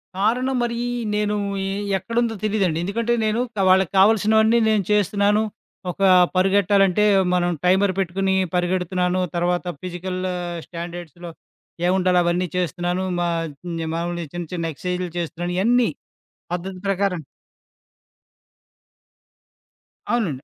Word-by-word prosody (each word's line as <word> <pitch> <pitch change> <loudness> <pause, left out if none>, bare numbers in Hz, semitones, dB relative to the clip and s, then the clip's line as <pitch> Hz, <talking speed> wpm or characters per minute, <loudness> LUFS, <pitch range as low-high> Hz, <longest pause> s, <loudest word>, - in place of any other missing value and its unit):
కారణం 250 +6 +1
మరీ 235 0 -2 0.4
నేను 210 0 0 0.3
ఎ - - -2 0.3
ఎక్కడుందో 230 +3 -1
తెలీదండి. 195 -6 +1
ఎందుకంటే, 230 +5 -1
నేను 215 +2 0 0.2
కా 195 - 0
వాళ్ళకి 190 -2 +4
కావాల్సినవన్నీ 220 +2 +4
నేను 210 -3 +2
చేస్తున్నాను. 205 +1 +2 0.5
ఒక 195 - -11 0.3
పరిగెట్టాలంటే, 195 +1 +3 0.3
మనం 175 -1 +2 0.2
టైమర్ 190 +1 +3
పెట్టుకొని 190 +1 0 0.2
పరిగెడుతున్నాను, 180 0 0
తర్వాత 175 +1 0 0.2
ఫిజికల్ 185 0 -5 0.5
స్టాండర్డ్స్‌లో 175 0 -8 0.6
ఏవుండాలో 185 -1 +3
అవన్నీ 175 +1 0
చేస్తున్నాను. 175 +1 -1 0.2
మా 175 0 0 0.7
మాములు 170 0 -3
చిన్న 175 -1 -4
చిన్న 165 -2 -2
ఎక్సైజులు 180 0 -3
చేస్తున్నాను, 175 +1 -4
ఇయన్నీ. 240 +1 +3 0.6
పద్ధతి 185 +1 -4
ప్రకారం. 195 -4 0 2.9
అవునండి. 165 - -1
185 Hz, 105 wpm, -22 LUFS, 175-210 Hz, 2.9 s, వాళ్ళకి